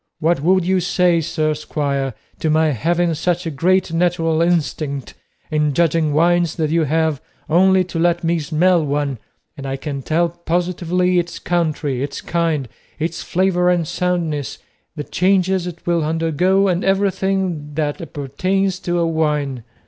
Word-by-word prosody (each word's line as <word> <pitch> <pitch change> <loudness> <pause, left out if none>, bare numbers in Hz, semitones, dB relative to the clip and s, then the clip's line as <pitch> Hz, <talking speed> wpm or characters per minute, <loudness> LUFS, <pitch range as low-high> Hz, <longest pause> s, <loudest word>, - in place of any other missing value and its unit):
What 165 -1 +1
would 185 +2 +3
you 190 +1 +2
say, 175 -1 +2
sir 155 -1 0
squire, 140 -4 -2 0.2
to 160 - 0
my 155 0 +3
having 170 +6 +1
such 175 +3 -1
a 165 - -2
great 180 +4 +1
natural 165 -2 +1
instinct 155 -5 -1 0.4
in 150 -2 +1
judging 165 -2 +2
wines 170 +2 +2
that 155 -2 -1
you 165 -1 +2
have 160 -1 0 0.3
only 185 +3 +4
to 180 -2 -5
let 175 +1 +2
me 170 0 +1
smell 165 +3 +2
one 140 -3 -1 0.4
and 135 -1 -7
I 135 - -2
can 140 -1 -5
tell 170 +5 +1
positively 175 +1 0
its 175 0 -4
country, 155 -6 -1
its 140 0 -4
kind, 165 -5 -1 0.3
its 165 +1 -3
flavour 180 -1 +1
and 175 -3 +1
soundness, 165 -6 -2 0.4
the 150 - -4
changes 185 +1 +1
it 170 -1 -9
will 170 -2 +1
undergo, 165 +5 +1
and 180 0 0
everything 190 -5 0
that 150 +3 -2
appertains 180 +6 -2
to 175 -2 -2
a 170 - +2
wine? 150 -6 -1
165 Hz, 155 wpm, -19 LUFS, 150-180 Hz, 0.4 s, only